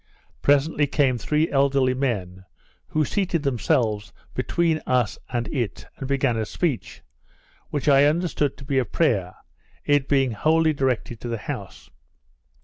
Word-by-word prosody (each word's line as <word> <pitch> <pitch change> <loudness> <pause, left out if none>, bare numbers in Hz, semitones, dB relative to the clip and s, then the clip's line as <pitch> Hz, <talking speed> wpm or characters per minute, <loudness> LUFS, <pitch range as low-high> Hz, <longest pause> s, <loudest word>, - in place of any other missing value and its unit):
Presently 145 +1 +3
came 135 -4 +1
three 150 +7 +1
elderly 135 -2 +3
men, 100 -9 -2 0.4
who 155 -1 0
seated 180 -2 -1
themselves 110 -5 0 0.2
between 165 -2 0
us 125 -4 +1
and 120 -2 -2
it, 120 - -3
and 135 - -5
began 135 -4 +1
a 110 - -1
speech, 155 - -3 0.7
which 145 -1 -3
I 140 -1 +6
understood 150 -2 0
to 140 - -11
be 135 -1 +1
a - - +2
prayer, 100 - 0 0.5
it 145 -2 +2
being 135 -3 +3
wholly 155 +8 +2
directed 125 -5 -1
to - - -5
the 115 -1 -2
house. - - -7
135 Hz, 140 wpm, -24 LUFS, 120-150 Hz, 0.7 s, I